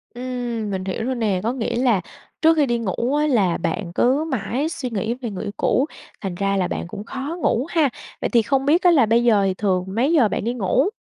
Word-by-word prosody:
Ừm, 245 Hz, -3 st, -3 dB
mình 190 Hz, -1 st, -3 dB
hiểu 195 Hz, +4 st, -3 dB
rồi 260 Hz, 0 st, -1 dB
nè. 210 Hz, -6 st, 0 dB
Có 235 Hz, +3 st, 0 dB
nghĩa 235 Hz, -3 st, -2 dB
là 235 Hz, -6 st, +2 dB, 0.4 s
trước 325 Hz, 0 st, +5 dB
khi 290 Hz, -, +4 dB
đi 240 Hz, -2 st, 0 dB
ngủ 235 Hz, +6 st, -1 dB
á, 300 Hz, +1 st, +2 dB
là 200 Hz, -, +2 dB
bạn 170 Hz, +1 st, -3 dB
cứ 270 Hz, +5 st, +3 dB
mãi 260 Hz, +6 st, -1 dB
suy 265 Hz, -6 st, -4 dB
nghĩ 225 Hz, +1 st, -2 dB
về 245 Hz, -2 st, -6 dB
người 195 Hz, -, -5 dB
yêu 205 Hz, -, -4 dB
cũ, 270 Hz, -, +2 dB, 0.4 s
thành 190 Hz, -3 st, -4 dB
ra 195 Hz, +1 st, 0 dB
là 185 Hz, -, +1 dB
bạn -, -, -4 dB
cũng 205 Hz, +3 st, -7 dB
khó 270 Hz, +7 st, -5 dB
ngủ 245 Hz, +5 st, +1 dB
ha. 315 Hz, -5 st, +2 dB, 0.3 s
Vậy -, -, 0 dB
thì 235 Hz, -, +4 dB
không 270 Hz, +5 st, 0 dB
biết 325 Hz, +5 st, +4 dB
á, 355 Hz, -, +6 dB
là 270 Hz, -8 st, +5 dB
bây 230 Hz, +2 st, +3 dB
giờ 215 Hz, -4 st, +4 dB
thì 190 Hz, -, +1 dB
thường 185 Hz, -2 st, 0 dB
mấy 235 Hz, +10 st, 0 dB
giờ 255 Hz, -9 st, +5 dB
bạn -, -, -3 dB
đi 235 Hz, +2 st, -1 dB
ngủ? 250 Hz, -, +1 dB
235 Hz, 250 wpm, -22 LUFS, 200-265 Hz, 0.4 s, á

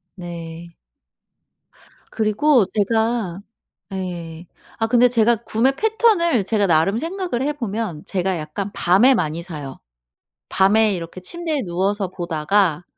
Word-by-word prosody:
네. 170 Hz, -1 st, -9 dB, 1.4 s
그리고 220 Hz, +2 st, +3 dB
제가 220 Hz, -3 st, 0 dB, 0.5 s
예. 175 Hz, -3 st, -6 dB, 0.3 s
아 225 Hz, -, +1 dB
근데 245 Hz, +1 st, +5 dB
제가 230 Hz, -1 st, +3 dB
구매 230 Hz, +5 st, +2 dB
패턴을 420 Hz, -, +2 dB
제가 205 Hz, -1 st, +1 dB
나름 165 Hz, +5 st, +3 dB
생각을 340 Hz, -3 st, -3 dB
해 295 Hz, +2 st, 0 dB
보면 215 Hz, -, -4 dB
제가 190 Hz, -1 st, -1 dB
약간 160 Hz, +7 st, -5 dB
밤에 200 Hz, +10 st, +4 dB
많이 160 Hz, -3 st, -2 dB
사요. 150 Hz, -7 st, -8 dB, 0.7 s
밤에 210 Hz, +2 st, +3 dB
이렇게 170 Hz, +2 st, -7 dB
침대에 320 Hz, -, -3 dB
누워서 190 Hz, +3 st, -1 dB
보다가 175 Hz, 0 st, 0 dB
200 Hz, 235 characters per minute, -21 LUFS, 175-235 Hz, 1.4 s, 근데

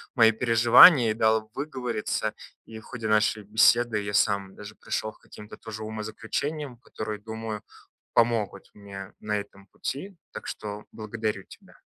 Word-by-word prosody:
мои 115 Hz, -2 st, +6 dB
переживания 115 Hz, +3 st, +7 dB
и -, -, 0 dB
дал 110 Hz, 0 st, +1 dB
выговориться, 130 Hz, -6 st, -3 dB, 0.3 s
и 110 Hz, -1 st, -10 dB
в -, -, -17 dB
ходе 115 Hz, -4 st, -6 dB
нашей 110 Hz, 0 st, +2 dB
беседы 110 Hz, +2 st, +3 dB
я 100 Hz, 0 st, -5 dB
сам 100 Hz, -2 st, +1 dB
даже 105 Hz, +1 st, -10 dB
пришел 110 Hz, -, -3 dB
к -, -, -25 dB
каким-то 105 Hz, 0 st, -13 dB
тоже 110 Hz, -1 st, -8 dB
умозаключениям, 115 Hz, +6 st, -4 dB
которые, 110 Hz, -3 st, -6 dB
думаю, 110 Hz, 0 st, -6 dB, 0.5 s
помогут 115 Hz, -4 st, +1 dB
мне 100 Hz, -1 st, -10 dB
на 105 Hz, 0 st, -2 dB
этом 100 Hz, -1 st, -10 dB
пути, 185 Hz, +8 st, -6 dB, 0.2 s
так -, -, -8 dB
что 105 Hz, 0 st, -6 dB
благодарю 110 Hz, -2 st, -4 dB
тебя. -, -, -17 dB
110 Hz, 145 wpm, -26 LUFS, 105-115 Hz, 0.5 s, переживания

